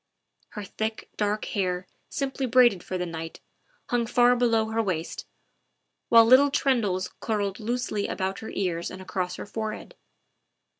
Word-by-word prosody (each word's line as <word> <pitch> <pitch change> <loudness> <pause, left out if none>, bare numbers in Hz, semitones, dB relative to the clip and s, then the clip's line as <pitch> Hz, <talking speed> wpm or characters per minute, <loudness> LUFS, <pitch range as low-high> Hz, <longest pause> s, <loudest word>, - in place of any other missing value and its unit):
Her 210 - -3
thick, 220 +2 -4
dark 210 0 -1
hair, 185 -3 -2 0.2
simply 270 -2 -2
braided 240 -6 +5
for 185 - -4
the 180 - -2
night, 165 -1 -7 0.5
hung 240 -1 +1
far 245 +1 +4
below 230 -3 +2
her 225 +1 0
waist, 175 -6 -3 0.8
while 230 -1 +8
little 260 +4 +7
tendrils 220 -10 0
curled 205 -3 -2
loosely 225 -2 -2
about 190 +1 -3
her 220 - -7
ears 175 -3 -2
and 185 - -9
across 185 -1 -3
her - - -7
forehead. 220 +1 -5
215 Hz, 145 wpm, -26 LUFS, 185-240 Hz, 0.8 s, while